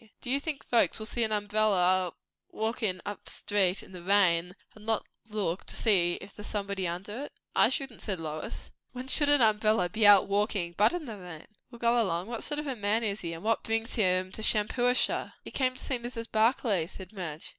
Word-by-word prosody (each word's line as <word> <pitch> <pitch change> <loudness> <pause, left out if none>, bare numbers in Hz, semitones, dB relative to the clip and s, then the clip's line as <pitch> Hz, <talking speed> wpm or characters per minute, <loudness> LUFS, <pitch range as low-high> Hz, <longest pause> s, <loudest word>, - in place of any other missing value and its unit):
"Do 245 - -5
you 275 - +3
think 295 -1 -5
folks 235 - +3
will 220 - -2
see 235 +1 0
an 220 - -1
umbrella 200 -4 +2 0.4
walkin' 220 -4 -2
up 205 - -7
street 195 -2 0
in - - -15
the 180 -2 -9
rain, 180 -2 +2 0.2
and 215 - -15
not 225 -1 0 0.2
look 200 -4 -2
to - - -7
see 180 -6 +3
if 200 - -13
there's 210 - -8
somebody 200 -3 -2
under 205 +10 -5
it?" - - -13 0.2
"I - - +5
shouldn't," 265 -3 -3
said 190 -4 -3
Lois. 155 -1 -6 0.2
"When 255 +1 -7
should 290 +2 +5
an 290 -4 +5
umbrella 215 -3 +3
be 215 +3 +3
out 200 -2 +8
walking, 200 -3 0
but 210 +4 +4
in 350 -3 -4
the 220 -5 -7
rain?" 175 -4 -10 0.2
"Well, 240 - -12
go 235 0 +2
along. 175 -4 -1
What 235 -1 -4
sort 295 - -2
of 300 - -3
a 270 -3 -3
man 210 +1 0
is 205 -1 -2
he? 170 -1 -4
and 165 +2 -9
what 225 +1 +1
brings 225 +1 -2
him 185 -3 +1
to 220 - -5
Shampuashuh?" 240 +4 +2
"He - - -9
came 255 -1 0
to - - -10
see 260 -3 -2
Mrs. 235 -1 -6
Barclay," 220 -6 +2
said 190 +1 -11
Madge. 165 -6 -6
210 Hz, 215 wpm, -29 LUFS, 185-235 Hz, 0.4 s, out